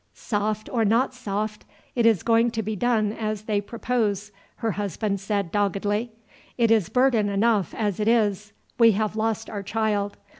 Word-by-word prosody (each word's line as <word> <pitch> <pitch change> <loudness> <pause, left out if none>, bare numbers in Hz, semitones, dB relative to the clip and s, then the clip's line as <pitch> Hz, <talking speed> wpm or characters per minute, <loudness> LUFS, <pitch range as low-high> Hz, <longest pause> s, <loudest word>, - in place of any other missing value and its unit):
"Soft 215 0 -2
or 235 -3 0
not 230 +5 +2
soft, 215 -3 -4 0.3
it 235 -2 +3
is 220 -7 +3
going 230 +1 +3
to 225 - 0
be 215 +1 -3
done 215 -1 +1
as 215 -2 -3
they 210 -2 0
propose," 210 -2 -2 0.2
her 225 -2 -1
husband 200 0 -2
said 200 -2 -2
doggedly. 205 +2 0 0.5
"It 230 -2 +3
is 215 -6 +3
burden 250 -5 +3
enough 205 -1 +2
as 210 -4 -1
it 210 - 0
is 210 -3 +1 0.3
we 230 -2 +7
have 215 +1 -1
lost 220 0 -1
our 205 -2 -5
child. 205 -1 -1
215 Hz, 165 wpm, -24 LUFS, 205-225 Hz, 0.5 s, we